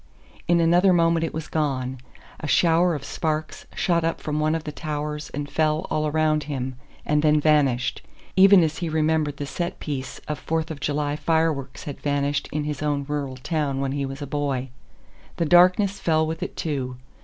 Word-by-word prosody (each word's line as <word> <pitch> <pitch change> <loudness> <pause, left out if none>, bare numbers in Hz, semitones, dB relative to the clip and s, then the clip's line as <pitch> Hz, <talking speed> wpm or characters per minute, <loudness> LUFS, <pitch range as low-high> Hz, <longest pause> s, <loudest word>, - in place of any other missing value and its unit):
In 175 0 +4
another 175 +3 +4
moment 165 -1 +3
it 165 - -1
was 160 -1 -5
gone; 130 -4 -2 0.4
a 155 - -5
shower 170 +2 +3
of 140 - -6
sparks 155 +1 -3
shot 170 -2 +1
up 165 - -1
from 150 0 -2
one 155 +1 +1
of 165 - -3
the 150 - -5
towers 150 -1 -4
and 145 +1 -4
fell 155 +3 0
all 155 0 +1
around 155 0 +1
him, 130 -3 -3 0.3
and 150 0 +2
then 150 0 +4
vanished, 145 -5 +2 0.3
even 190 -1 +7
as 160 -1 -1
he 170 -2 -2
remembered 155 -2 +1
the 145 - -4
set 170 +4 -4
piece 135 -3 -5
of 150 - -3
"Fourth 160 0 -2
of 150 - -6
July" 145 0 -1
fireworks 150 -3 0
had 145 - -7
vanished 145 0 0
in 150 0 -1
his 150 -2 -4
own 145 -2 -1
rural 140 -3 -3
town 140 -1 -1
when 135 -1 -1
he 140 0 -2
was 135 +2 -6
a - - -3
boy. 140 -2 -2 0.7
The 170 - 0
darkness 185 +4 +5
fell 160 -1 +2
with 160 +1 -4
it - - -5
too. 130 -5 -3
150 Hz, 190 wpm, -24 LUFS, 145-160 Hz, 0.7 s, even